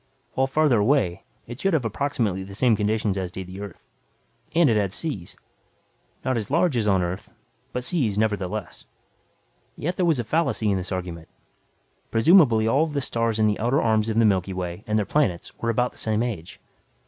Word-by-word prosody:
While 135 0 +1
farther 140 -4 +3
away 105 -6 +2 0.2
it 120 +2 -9
should 195 +2 +1
have 135 -7 0
approximately 115 -5 -1
the 95 +1 -9
same 120 +1 +3
conditions 105 -1 0
as 95 -1 -3
did 95 +1 -6
the 95 +2 -9
Earth. 100 -4 -9 0.7
And 170 -2 +5
it 115 - +3
had 100 -3 0
seas, 110 - -5 0.9
not 130 -2 +1
as 110 - -3
large 170 0 +2
as 110 -3 +1
on 95 -3 +3
Earth, 90 +3 -5 0.4
but 125 - -3
seas, 125 - 0
nevertheless. 105 -4 -2 0.9
Yet 175 +5 -3
there 180 - +2
was 160 -4 +3
a 120 - -1
fallacy 120 -5 0
in 95 -1 0
the 90 +1 -3
argument. 85 -3 -6 0.8
Presumably 115 - +5
all 140 +7 +3
of 155 - -6
the 145 - 0
stars 115 -3 -1
in 110 - +3
the 105 -1 +1
outer 120 +5 +2
arms 110 -1 +2
of 110 - -1
the 115 - +5
Milky 95 -2 +1
Way 90 +1 -5
and 110 0 +1
their 105 - +1
planets 115 -13 0
were 115 - -1
about 125 +2 +1
the - - -12
same 110 +1 0
age. 95 -9 -5
110 Hz, 195 wpm, -24 LUFS, 100-130 Hz, 0.9 s, And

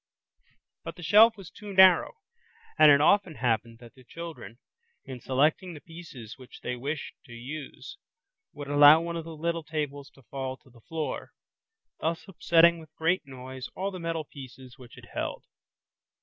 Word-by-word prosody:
But - - -7
the 175 - -11
shelf 220 +6 +6
was 195 -4 -12
too 205 -2 -10
narrow, 190 -2 +6 0.6
and 155 - +8
it 140 - +6
often 185 0 +3
happened 115 -2 -1
that 120 0 -15
the 130 - -19
children 165 -4 -9 0.5
in 130 -2 -8
selecting 150 +8 0
the - - -9
pieces 145 -9 -12
which 130 - -14
they 125 - -4
wished 140 +4 -5
to 120 - -13
use 140 - -9 0.5
would 145 -1 -9
allow 145 +2 +7
one 170 0 -4
of 165 -1 -5
the 165 -1 -8
little 170 +1 -2
tables 145 -2 -5
to 135 - -20
fall 130 0 -6
to 130 - -24
the 120 -1 -20
floor, 160 +3 -5 0.7
thus 165 +3 -3
upsetting 170 -2 +3
with 160 -1 -16
great 160 -2 0
noise 130 0 -8
all 195 +2 -3
the 185 - -8
metal 165 -2 -3
pieces 130 -2 -12
which 125 -2 -15
it - - -13
held. - - -4
150 Hz, 170 wpm, -27 LUFS, 130-170 Hz, 0.7 s, and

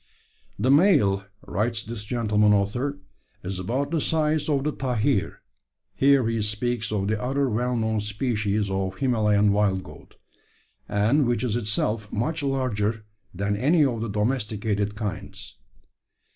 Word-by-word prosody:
"`The 130 +2 +4
male,' 140 - +4 0.2
writes 115 +2 -1
this 110 -2 -6
gentleman 105 -2 +2
author, 105 +7 0 0.5
`is 95 0 -4
about 130 - -2
the 165 -3 +1
size 155 -1 0
of 140 -2 +1
the 150 - 0
tahir 125 -5 -1 0.5
[here 135 -3 +4
he 115 -1 0
speaks 110 +2 -1
of 100 -2 -1
the 110 0 -1
other 135 +2 0
well 125 +2 0
known 110 -1 0
species 105 -1 -1
of 95 -1 -2
Himalayan 105 -5 +2
wild 100 -2 +1
goat, - - -14 0.7
and 110 +7 +2
which 120 +1 0
is 115 -3 0
itself 105 -1 -1
much 150 +9 -1
larger 115 -6 -1 0.3
than 100 +2 -1
any 145 +8 +3
of 120 -4 -1
the 115 - -3
domesticated 105 -2 -1
kinds]. 105 -4 -6
110 Hz, 140 wpm, -25 LUFS, 105-130 Hz, 0.7 s, `The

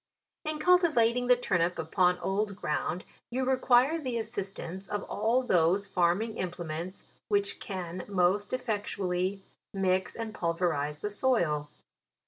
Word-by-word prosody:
In 310 0 -2
cultivating 305 -9 +3
the 250 - +7
turnip 180 -7 0
upon 180 +3 +2
old 200 +2 -1
ground, 175 0 -2 0.3
you 255 +2 -1
require 260 +4 +3
the 255 -4 -2
assistance 195 -3 -5
of 205 -1 -3
all 230 +5 +1
those 180 -2 +3
farm 175 +2 +2
ing 225 -1 -6
implements, 175 0 -4 0.2
which 200 -1 0
can 180 -2 -5
most 195 +1 +1
effectually 200 -6 -2 0.3
mix 190 -1 +1
and 225 -2 -5
pulverize 165 -5 -1
the 210 - -2
soil. 175 - +1
195 Hz, 125 wpm, -29 LUFS, 180-235 Hz, 0.3 s, the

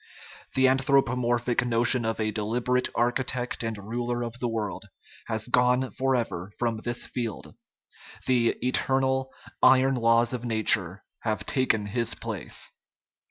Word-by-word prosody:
The 130 0 +5
anthropomorphic 125 -3 +2
notion 120 0 +3
of 115 0 -2
a 110 0 0
deliberate 120 +4 0
architect 125 +1 -1
and 115 -2 -3
ruler 120 +4 -3
of 120 +1 -6
the 120 - -1
world 110 -3 -4 0.4
has 110 0 -1
gone 125 +1 +2
forever 115 -8 -1
from 115 -2 -1
this 120 +2 -2
field; 115 -5 -5 0.7
the 120 -2 +2
"eternal, 130 +1 +1 0.3
iron 130 +1 +5
laws 115 0 +3
of 120 -2 -4
nature" 105 -5 +2 0.2
have 105 -4 -2
taken 120 -6 +1
his 115 +2 -2
place. - - -3
120 Hz, 125 wpm, -26 LUFS, 110-125 Hz, 0.7 s, The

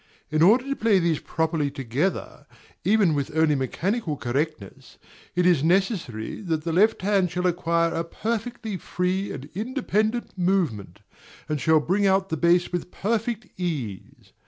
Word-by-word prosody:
In 155 0 +1
order 220 +9 +6
to 275 +1 -2
play 220 -5 +3
these 170 -4 +1
properly 160 -2 -1
together, 135 +8 -3 0.4
even 200 -5 +3
with 145 +2 -2
only 160 -1 +4
mechanical 155 - -1
correctness, 130 -5 -4 0.4
it 180 0 +2
is 170 -6 +4
necessary 170 - 0
that 160 -6 -2
the 165 0 -2
left 210 +3 +3
hand 195 -2 +2
shall 180 +2 -2
acquire 170 -1 +1
a 165 - -1
perfectly 225 +3 -4
free 180 +3 -2
and 135 - -7
independent 225 0 -1
movement, 165 - -1 0.5
and 150 -3 -2
shall 160 -1 +4
bring 195 +6 +1
out 190 0 +2
the 160 - -1
bass 175 +3 +3
with 175 0 -3
perfect 225 +3 -2
ease. 135 - -5
175 Hz, 150 wpm, -25 LUFS, 155-200 Hz, 0.5 s, order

